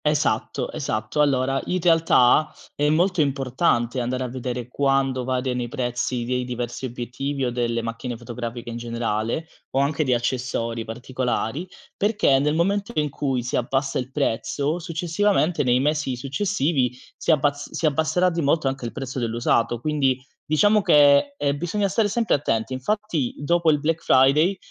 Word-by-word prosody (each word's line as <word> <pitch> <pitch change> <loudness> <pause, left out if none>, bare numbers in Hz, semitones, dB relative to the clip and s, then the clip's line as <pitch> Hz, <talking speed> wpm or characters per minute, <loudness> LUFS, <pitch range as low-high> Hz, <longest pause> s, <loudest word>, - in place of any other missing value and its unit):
Esatto, 150 0 0
esatto. 110 +7 -2
Allora, 135 -2 +2
in 185 - -1
realtà, 160 -4 +4 0.2
è 145 0 +1
molto 175 +3 +2
importante 130 -3 0
andare 125 +2 -2
a - - -2
vedere 125 -1 -4
quando 135 -1 +1
variano 125 0 -1
i 120 - -3
prezzi 120 -1 -2
dei 125 +1 -1
diversi 125 +1 -4
obiettivi 130 +3 -3
o 125 - -1
delle 120 -1 -1
macchine 115 +1 -5
fotografiche 120 0 -6
in 115 - -5
generale, 115 +4 -2 0.2
o 135 - 0
anche 140 +2 +1
di 130 -3 +2
accessori 120 -2 -2
particolari, 125 +5 -3 0.3
perché 205 -10 +2
nel 150 +2 +1
momento 200 +6 0
in 150 -1 0
cui, 135 -3 -1
si 125 - -3
abbassa 135 +3 0
il 125 0 -5
prezzo, 145 +3 -1
successivamente, 175 +1 0
nei 125 -1 +3
mesi 145 -1 0
successivi, 140 - -1 0.2
si - - -6
abbaz 145 -1 +1
si - - -2
abbasserà 160 +4 +2
di 170 0 -2
molto, 145 0 +1
anche 135 -2 -3
il 115 - -4
prezzo 135 -2 -5
dell'usato. 115 0 0
Quindi, 135 -2 +1 0.2
diciamo 205 +8 +3
che, 145 - +5
ehm, 140 0 0
bisogna 200 +5 0
stare 205 +3 +1
sempre 225 +2 0
attenti. 115 -4 0
Infatti, 160 - -2
dopo 170 +3 +2
il 150 -1 +3
Black 160 +2 -1
Friday, 150 +9 +4
135 Hz, 160 wpm, -23 LUFS, 125-155 Hz, 0.3 s, che